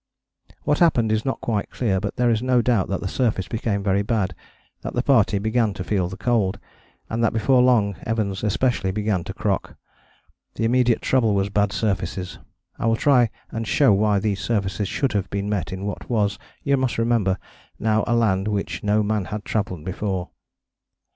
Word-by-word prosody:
What 150 - +1
happened 120 -10 +3
is 110 0 0
not 135 - -2
quite 105 -4 -2
clear, 100 -6 0
but 100 +1 -4
there 120 -1 +2
is 110 -1 +1
no 125 -1 +2
doubt 115 -6 +2
that 95 - -2
the 100 - -3
surface 110 -4 0
became 110 -4 -2
very 100 0 +2
bad, 100 -4 0 0.5
that - - -6
the - - +1
party - - +3
began 110 0 0
to 95 - -4
feel 95 -3 0
the 95 - -8
cold, 105 -2 +1 0.5
and 115 +1 -2
that 115 - +2
before 125 +3 +3
long 115 -6 +3
Evans 105 -3 -2
especially 105 -2 +1
began 105 -3 -1
to - - -5
crock. - - -2 0.8
The 115 - -1
immediate 120 0 +2
trouble 115 -6 +2
was 100 0 +1
bad 100 0 +1
surfaces. 95 -3 -2 0.4
I 115 - 0
will 115 - +3
try 125 -2 +4 0.2
and 115 -1 -4
show 135 -3 +4
why 105 +1 +3
these 100 -1 -1
surfaces 100 -3 -1
should 135 +7 -1
have 95 -3 -1
been 100 0 -2
met 105 -3 -2
in 95 +1 -5
what 100 - -5
was, 105 -3 0 0.2
you 140 -1 +2
must 130 -2 -1
remember, 115 -5 +1 0.4
now 110 0 +1
a 120 - +2
land 105 -4 +2
which 105 -2 -2
no 105 +1 +2
man 105 -2 0
had 105 +2 -6
travelled 95 -7 -2
before. 95 -1 -3
105 Hz, 190 wpm, -23 LUFS, 100-115 Hz, 0.8 s, try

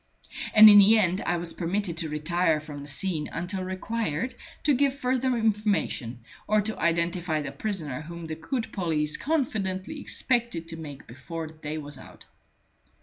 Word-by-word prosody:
And 215 0 +11
in 205 -1 +10
the 210 +3 +7
end 185 -3 +2
I 175 - +1
was 170 0 -4
permitted 180 0 -1
to 165 -2 -1
retire 160 +1 +1
from 150 -1 -9
the 145 - -9
scene 155 +1 0
until 185 +3 -3
required 185 - -3 0.3
to 295 - +4
give 275 +1 +2
further 255 -1 0
information, 210 - 0 0.3
or 215 0 +3
to 215 +1 -2
identify 170 -1 0
the 145 - -5
prisoner 150 -4 -3
whom 170 +1 -8
the 160 - -5
good 225 - -4
police 155 -5 0
confidently 225 -4 -2
expected 235 -10 -1
to 165 - -5
make 145 -4 -9
before 160 +7 -7
the 155 - -10
day 155 0 -5
was 145 -3 -7
out. - - -14
175 Hz, 165 wpm, -27 LUFS, 155-215 Hz, 0.3 s, And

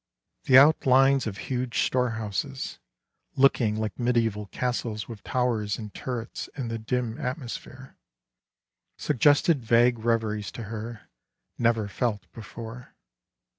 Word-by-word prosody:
The 130 - +7
outlines 135 -2 +5
of 100 -2 -5
huge 125 +1 -1
storehouses, 125 +1 -2 0.6
looking 125 -5 +3
like 110 +2 -3
medieval 115 -4 0
castles 115 -2 -3
with 115 -4 -9
towers 115 -5 0
and 105 -3 -8
turrets 120 -3 -5
in 125 -4 -3
the 115 0 -3
dim 120 0 -2
atmosphere, 130 0 -6 1.0
suggested 145 +1 +3
vague 120 +1 +4
reveries 110 -2 -1
to 120 - -6
her, 115 0 -7 0.5
never 115 -3 +2
felt 105 0 -2
before. 115 +2 -10
120 Hz, 110 wpm, -26 LUFS, 110-125 Hz, 1.0 s, The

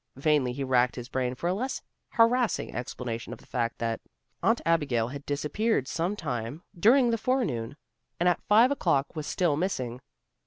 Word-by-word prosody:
Vainly 140 -2 +2
he 140 +2 -3
racked 125 -2 +2
his 125 0 -7
brain 130 -1 -1
for 170 - -3
a 180 - +2
less 255 +7 -3 0.3
harassing 235 +1 +2
explanation 120 -1 -5
of - - -8
the - - -19
fact 115 -2 -2
that 115 -1 -2 0.4
Aunt 230 +1 +3
Abigail 140 -9 +2
had 140 +2 -7
disappeared 150 - 0
some 170 +8 -1
time 130 - -4
during 235 +7 +5
the 230 - 0
forenoon, 150 - -1 0.4
and 175 - +2
at 180 - +2
five 225 +5 +5
o'clock 165 - +1
was 155 -1 -4
still 175 -5 +1
missing. 130 -8 -2
145 Hz, 170 wpm, -28 LUFS, 125-205 Hz, 0.4 s, during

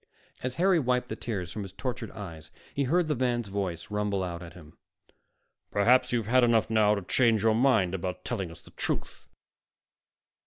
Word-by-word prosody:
As 130 0 -3
Harry 185 0 +4
wiped 125 -2 0
the - - -3
tears 95 -7 -4
from 105 - -5
his 95 -2 -7
tortured 125 -4 -4
eyes, 80 -6 -9 0.2
he 140 - 0
heard 170 +6 +2
the 155 -1 0
man's 120 -4 0
voice 95 -3 -3
rumble 105 -2 0
out 85 -1 -4
at 85 -1 -9
him: 80 -4 -14 0.9
"Perhaps 120 +6 +3
you've 120 -3 0
had 125 +3 +4
enough 115 -2 +3
now 105 -1 +4
to 100 - -4
change 110 +3 +3
your 110 -1 +4
mind 110 -7 +3
about 90 -1 -4
telling 100 -8 -2
us 85 0 -12
the - - -16
truth." - - -4
110 Hz, 185 wpm, -28 LUFS, 95-125 Hz, 0.9 s, Harry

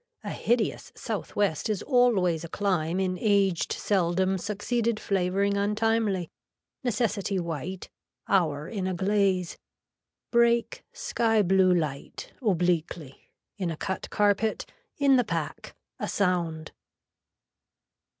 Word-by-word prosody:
A - - -4
hideous 235 -2 -1
south - - -5
west 205 -1 0
is 210 -3 -1
always 210 - +3
a 170 - -7
climb 180 -3 0
in 185 -1 -1
aged 200 -5 +2
seldom 190 0 +1
succeeded 215 +3 -1
flavoring 195 +1 0
untimely, 210 -3 0 0.5
necessity 210 -4 0
white, 170 +2 -5 0.4
hour 155 -6 +1
in 190 -1 -3
a 185 - -1
glaze. 190 -2 +1 0.7
Break, 235 - +2
sky 225 -2 +1
blue 190 0 +4
light, 150 -5 -4
obliquely, 175 - -1 0.3
in 185 -4 -2
a 165 - -4
cut 190 +2 -4
carpet, 210 +1 +1 0.3
in 275 -2 +5
the 245 - +3
pack. 220 - -4 0.2
A - - -2
sound. 170 -5 -1
195 Hz, 110 wpm, -27 LUFS, 175-215 Hz, 0.7 s, in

